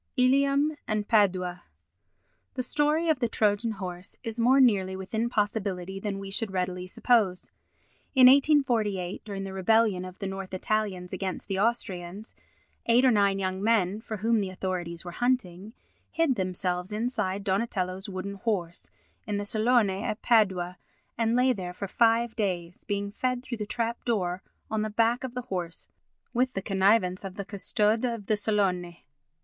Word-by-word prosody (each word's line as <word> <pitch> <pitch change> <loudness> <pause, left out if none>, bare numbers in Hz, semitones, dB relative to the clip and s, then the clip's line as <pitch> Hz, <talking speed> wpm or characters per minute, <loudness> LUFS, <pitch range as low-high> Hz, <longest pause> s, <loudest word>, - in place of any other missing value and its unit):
Ilium 275 +4 +3
and 210 -1 -1
Padua 185 -5 +2 0.9
The 255 - -1
story 300 +5 +1
of 315 -5 +2
the 240 -2 0
Trojan 215 +1 +1
horse 180 -2 -7
is 225 -1 -5
more 255 +4 +5
nearly 195 -7 +3
within 220 +5 -2
possibility 200 -4 -2
than 200 -1 -3
we 195 0 -7
should 215 +2 -1
readily 180 -1 -3
suppose. 200 -3 +1 0.6
In 260 -1 +8
1848, 245 - +3
during 200 -2 -5
the 195 0 -6
rebellion 195 0 +2
of 185 0 -9
the 200 - -5
North 190 -1 -5
Italians 190 -3 -2
against 190 -1 -4
the 190 -1 -2
Austrians, 205 -3 -2 0.5
eight 240 +3 +5
or 255 - +6
nine 200 -3 +3
young 190 0 -2
men, 210 -2 +2
for 220 -1 -5
whom 225 +3 +2
the 195 -2 -2
authorities 180 -2 -4
were 175 - -5
hunting, 215 -4 -1 0.4
hid 330 -4 +2
themselves 185 -2 -2
inside 210 -3 -2
Donatello's 190 -1 -1
wooden 190 +1 -5
horse 195 -5 -3 0.4
in 205 -1 -1
the 205 - -3
Salone 220 0 +3
at 210 - -3
Padua 190 -6 +2 0.4
and 230 0 +1
lay 255 +1 +4
there 180 -5 -6
for 200 +2 -5
five 230 +2 +2
days, 180 -5 -3
being 200 0 -2
fed 250 +3 -2
through 240 -2 -5
the 210 - -3
trap 230 +1 -2
door 185 -6 -1 0.3
on 220 -1 0
the 215 - -1
back 230 +3 +1
of 255 -1 -6
the 250 - -3
horse 180 -7 -5 0.5
with 250 +1 +1
the 195 - -2
connivance 190 -1 +2
of 195 -1 -7
the 200 - -5
custode 210 +3 +1
of 230 -4 -2
the 215 - +2
Salone. 190 -5 0
205 Hz, 165 wpm, -27 LUFS, 185-230 Hz, 0.9 s, In